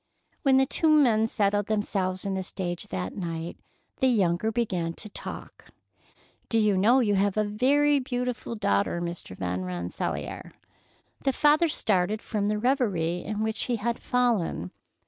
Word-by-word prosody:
When 270 -2 +4
the 265 - +5
two 320 +4 +1
men 240 -8 +4
settled 205 -2 +1
themselves 195 -3 -1
in 195 - -1
the 190 - -1
stage 180 -2 -4
that 90 0 -4
night, 165 -2 -5 0.4
the 265 - +3
younger 205 -3 +2
began 185 -8 -1
to 210 - -7
talk: - - -7 0.8
"Do 225 - +1
you 210 -2 +3
know 230 +8 +4
you 210 -4 +2
have 200 +1 +1
a 215 - +3
very 280 +7 +3
beautiful 250 -2 -3
daughter, 170 - +1
Mr. 170 - -6
Van 90 0 -2
Rensselaer?" 90 -1 -4 0.7
The 270 - +1
father 305 +5 +4
started 205 -5 +1
from 210 -2 -2
the 210 0 0
reverie 205 - 0
into 215 +1 -3
which 220 0 0
he 245 - 0
had 235 +2 -2
fallen. 230 - 0
210 Hz, 155 wpm, -27 LUFS, 180-245 Hz, 0.8 s, the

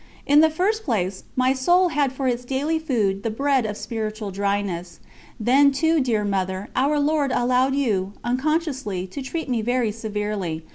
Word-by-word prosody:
In 290 +1 +5
the 320 +1 +6
first 400 +8 0
place, 195 - -2
my 255 +1 +3
soul 350 +7 +3
had 290 -4 +1
for 265 0 -3
its 245 -1 -1
daily 280 +6 -1
food 215 -11 0
the 225 - -2
bread 265 +1 +1
of 210 0 -5
spiritual 215 -2 -4
dryness. 200 -3 -2 0.4
Then, 270 +6 +5
too, 320 +4 +2
dear 230 -5 0
Mother, 190 0 -2
Our 285 +3 +2
Lord 290 -2 +1
allowed 255 +2 +2
you, 205 -8 0
unconsciously, 265 - -1
to 235 +10 -7
treat 320 +5 -4
me 245 -4 0
very 240 -1 0
severely. 210 -6 -3
250 Hz, 165 wpm, -23 LUFS, 205-285 Hz, 0.4 s, the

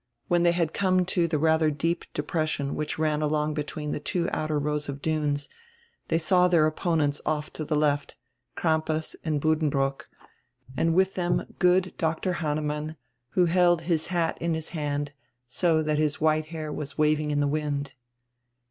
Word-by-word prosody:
When 175 0 +3
diey 170 0 +4
had 170 -3 0
come 185 -2 +2
to 175 -1 +1
die 160 -2 0
radier 160 +1 +3
deep 165 +4 -1
depression 150 -2 -1
which 150 - -3
ran 155 -1 +1
along 150 0 0
between 150 0 -4
die - - -3
two 175 +1 0
outer 155 -1 -1
rows 150 0 -1
of 140 0 -4
dunes 145 -2 -1 0.6
diey 165 - +2
saw 180 +2 +4
dieir 165 -3 +4
opponents 155 -3 0
off 150 -1 -2
to 155 - -4
die 150 +1 0
left, 145 -1 +1 0.4
Crampas 160 -1 0
and 155 -3 0
Buddenbrook, 145 -3 0 0.7
and 165 +4 +1
with 190 +1 +3
diem 175 -1 0
good 185 +1 +3
Dr. 165 +3 0
Hannemann, 150 0 -2 0.4
who 180 - +4
held 175 -1 +3
his 160 -2 0
hat 170 -2 -1
in 170 -1 0
his 160 0 -5
hand, 145 -3 -2 0.4
so 160 +4 +1
diat 150 -1 0
his 150 -2 0
white 155 0 +2
hair 155 -2 -5
was 145 -1 -5
waving 155 0 +2
in 145 -1 +1
die 145 - +2
wind. 145 -1 -2
155 Hz, 170 wpm, -27 LUFS, 150-170 Hz, 0.7 s, diey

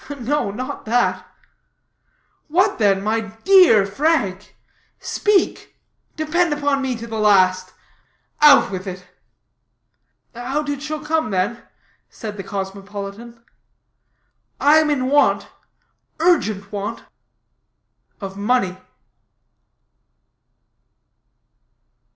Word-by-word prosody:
"No, 255 -1 -1
not 250 +6 -6
that." 185 -6 0 1.2
"What, 370 +4 +1
then, 195 -2 +2
my 220 +2 0
dear 225 - +4
Frank? 205 - -1 0.4
Speak 415 -3 -1 0.4
depend 320 +2 0
upon 285 -1 0
me 260 -2 -2
to 230 0 -8
the 225 -1 -5
last. 185 -3 +3 0.7
Out 295 -7 +6
with 190 0 -6
it." 185 -1 -7 1.3
"Out 270 +5 -3
it 285 -1 -3
shall 305 0 -5
come, 315 -5 0
then," 200 +5 -1 0.5
said 215 -3 -8
the 200 - -6
cosmopolitan. 200 +4 -7 1.2
"I 295 +2 +5
am 315 -1 +3
in 270 -4 0
want, 290 +2 +2 0.7
urgent 215 - +1
want, 205 -1 -5 1.2
of 195 -2 -7
money." 200 -3 0
230 Hz, 90 wpm, -20 LUFS, 200-295 Hz, 1.3 s, Out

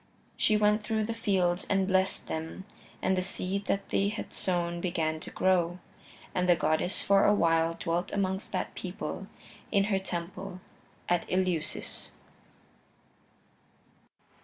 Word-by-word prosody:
She 215 - +3
went 210 +1 +3
through 220 0 0
the 230 +2 -2
fields 185 -5 +1
and 195 -1 +2
blessed 190 0 +2
them, 160 +4 -5 0.4
and 190 - +3
the 185 - +1
seed 195 +1 -2
that 195 0 -1
they 200 - +2
had 215 - -6
sown 175 -2 0
began 160 -3 -1
to - - -6
grow. 175 -2 +2 0.6
And 180 0 +1
the 175 - +7
goddess 165 +3 +1
for 200 0 +5
a 205 - +5
while 165 -2 +3
dwelt 170 +2 -1
amongst 190 0 -1
that - - -2
people, - - -5 0.4
in 200 -2 +4
her 190 - +3
temple 185 +1 -5 0.5
at 175 -1 +1
Eleusis. 180 -4 -1
185 Hz, 135 wpm, -30 LUFS, 170-195 Hz, 0.6 s, the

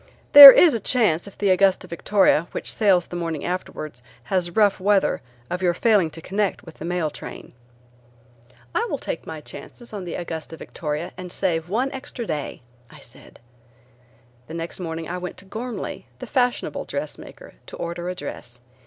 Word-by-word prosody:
There 285 -1 +15
is 325 +2 +6
a 230 - -1
chance 205 -7 +1
if 200 - -13
the 200 -2 +2
Augusta 190 0 +3
Victoria, 175 -1 +2
which - - -1
sails 195 -5 +3
the - - -9
morning 165 -3 -4
afterwards, 155 -7 -5 0.2
has 175 +7 -1
rough 205 +2 +2
weather 200 +1 +2 0.3
of 180 +6 -4
your 175 -2 +1
failing 205 -5 +3
to 165 - -11
connect 200 0 -2
with 165 - -14
the 155 - -6
mail 170 -3 -1
train." - - -10 1.2
"I - - +1
will - - -2
take - - -6
my - - -7
chances 240 -2 -10
on 200 -3 -5
the 170 - -5
Augusta 165 -2 -6
Victoria, 150 +1 -5
and 180 -1 -7
save 170 -3 0
one 250 +7 0
extra 265 -3 -7
day," 150 - -5 0.3
I - - -15
said. - - -15 1.1
The 160 - -8
next 165 +2 -6
morning 165 -2 -5
I 180 +1 -4
went 180 0 -7
to 195 - -10
Ghormley, 230 +5 -6
the - - -8
fashionable 250 -3 -1
dressmaker, - - -7
to - - -9
order 170 +1 -5
a 180 - -4
dress. 125 -6 -9
180 Hz, 175 wpm, -23 LUFS, 165-205 Hz, 1.2 s, There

